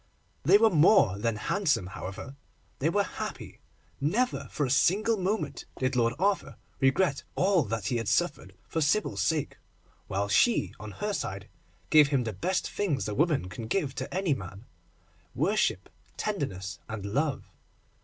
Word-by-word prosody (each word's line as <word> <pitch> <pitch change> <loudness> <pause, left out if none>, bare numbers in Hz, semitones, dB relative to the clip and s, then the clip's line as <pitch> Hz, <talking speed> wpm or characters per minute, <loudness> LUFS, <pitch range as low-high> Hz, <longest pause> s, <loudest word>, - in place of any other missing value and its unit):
They - - +6
were 225 +1 +4
more 155 - +5
than 115 +1 0
handsome, 150 - 0
however—they 130 - -6
were 205 +3 +2
happy. - - -7 0.4
Never 220 - 0
for 145 - -1
a - - -3
single 190 - +3
moment 185 -7 -2
did 130 0 0
Lord 115 -1 +2
Arthur 195 +1 0 0.2
regret 140 +3 +2
all 190 -1 +3
that 110 -1 -3
he 120 - 0
had 115 -2 -3
suffered - - 0
for 160 - -2
Sybil's 145 - +1
sake, 150 +8 -1 0.5
while 100 +1 -1
she, 165 - +3
on 105 -1 -8
her 210 0 -3
side, 100 - -4 0.4
gave 150 -2 +7
him 140 -3 +1
the 110 -2 -4
best 180 - -1
things 170 -10 -1
a 105 - -3
woman 150 - +1
can 95 +5 -7
give 140 - -1
to - - -5
any 185 -4 +1
man—worship, 125 - -4 0.3
tenderness, 100 - -3
and 110 -2 -5
love. 140 +6 -2
140 Hz, 150 wpm, -28 LUFS, -, 0.5 s, gave